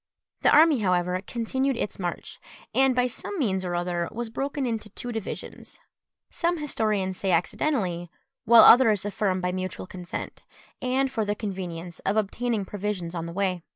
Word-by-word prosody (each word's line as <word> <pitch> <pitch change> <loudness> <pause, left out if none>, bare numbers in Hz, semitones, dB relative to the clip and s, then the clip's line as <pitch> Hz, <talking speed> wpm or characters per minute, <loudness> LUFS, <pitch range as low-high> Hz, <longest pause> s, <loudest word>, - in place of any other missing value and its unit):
The - - +5
army, 310 -3 +6
however, 180 -2 +1
continued 260 +3 -1
its 210 - -3
march, 175 -2 -5 0.3
and, 265 -1 +4
by 250 0 +3
some 250 - -4
means 195 - 0
or 175 -1 -2
other, 175 -1 -1
was 235 0 -5
broken 275 +3 -2
into 225 -3 -3
two 245 +4 -6
divisions; 220 -3 -7 0.5
some 345 0 0
historians 215 - -1
say 195 - 0
accidentally, 175 - 0 0.3
while 230 +1 +8
others 225 -5 +7
affirm 195 -2 -1
by 180 0 0
mutual 185 0 -4
consent, 180 -1 -7 0.4
and 260 +1 +1
for 225 - -1
the 205 0 -1
convenience 180 -5 -5
of 195 +3 -1
obtaining 215 0 -1
provisions 195 -4 -4
on 170 -1 -4
the - - -6
way. 185 -2 -1
205 Hz, 160 wpm, -26 LUFS, 180-245 Hz, 0.5 s, while